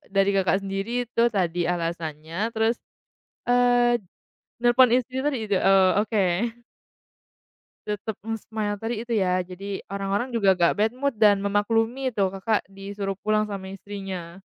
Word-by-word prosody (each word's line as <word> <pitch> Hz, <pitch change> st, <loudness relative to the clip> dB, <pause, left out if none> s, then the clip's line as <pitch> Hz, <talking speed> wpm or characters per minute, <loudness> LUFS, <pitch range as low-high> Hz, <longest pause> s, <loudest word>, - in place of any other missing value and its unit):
dari 195 Hz, 0 st, +4 dB
Kakak 195 Hz, 0 st, +2 dB
sendiri 195 Hz, +2 st, -4 dB, 0.2 s
itu 230 Hz, -, 0 dB
tadi 175 Hz, -2 st, 0 dB
alasannya, 165 Hz, -2 st, -4 dB, 0.2 s
terus, 225 Hz, +1 st, +2 dB, 0.7 s
eee, 245 Hz, 0 st, +4 dB, 0.6 s
nelpon 240 Hz, 0 st, +6 dB
istri 255 Hz, +1 st, -1 dB
tadi 295 Hz, -2 st, +1 dB
itu 205 Hz, -2 st, 0 dB
oh 195 Hz, -1 st, +6 dB
oke. 215 Hz, 0 st, +1 dB, 1.7 s
Tetap 210 Hz, +1 st, -3 dB
nge-smile 220 Hz, -1 st, -3 dB
tadi 225 Hz, +1 st, -3 dB
itu 235 Hz, 0 st, -4 dB
ya, 185 Hz, -2 st, +2 dB
jadi 190 Hz, +2 st, -6 dB
orang-orang 200 Hz, +4 st, -2 dB
juga 205 Hz, -6 st, +3 dB
nggak 175 Hz, -2 st, +3 dB
bad 215 Hz, +2 st, +2 dB
mood 275 Hz, -2 st, -2 dB
dan 205 Hz, -2 st, +5 dB
memaklumi 225 Hz, +6 st, 0 dB
tuh, 195 Hz, -3 st, +1 dB
Kakak 195 Hz, +3 st, 0 dB
disuruh 195 Hz, 0 st, -5 dB
pulang 215 Hz, +1 st, 0 dB
sama 190 Hz, -1 st, -6 dB
istrinya. 195 Hz, -3 st, -7 dB
205 Hz, 135 wpm, -25 LUFS, 195-225 Hz, 1.7 s, nelpon